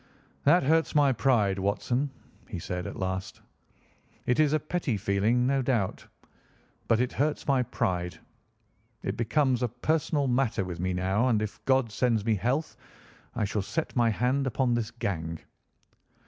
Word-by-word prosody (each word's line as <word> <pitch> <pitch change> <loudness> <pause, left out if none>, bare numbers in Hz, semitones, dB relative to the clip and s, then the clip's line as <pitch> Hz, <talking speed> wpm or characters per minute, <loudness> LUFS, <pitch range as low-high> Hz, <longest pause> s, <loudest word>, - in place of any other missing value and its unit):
"That 160 +4 +5
hurts 160 +3 +2
my 145 -2 +5
pride, 110 -5 +2
Watson," 120 +8 0 0.4
he - - -4
said 90 +1 -4
at - - -6
last. 95 0 -3 0.9
"It 125 - +1
is 150 -2 +4
a 155 - +3
petty 155 -7 -2
feeling, 105 +6 +1
no 135 +1 +2
doubt, 120 -7 -1 0.8
but 115 - +3
it 125 +1 +1
hurts 150 +1 -1
my 135 -2 +3
pride. 90 -7 -2 0.9
It - - -2
becomes 130 +2 +1
a 125 - +2
personal 150 +5 0
matter 125 -6 +1
with 90 -2 -6
me 95 +1 -1
now, 95 +6 +1
and, 115 -4 +3
if 105 -1 -5
God 130 -4 +2
sends 115 -2 +1
me 115 - +3
health, 125 - -1 0.6
I 105 - 0
shall 105 +1 -1
set 160 - -3
my 120 -2 +4
hand 125 +5 +1
upon 130 -1 +1
this 115 -2 -1
gang. 85 -8 -3
120 Hz, 160 wpm, -28 LUFS, 100-135 Hz, 0.9 s, That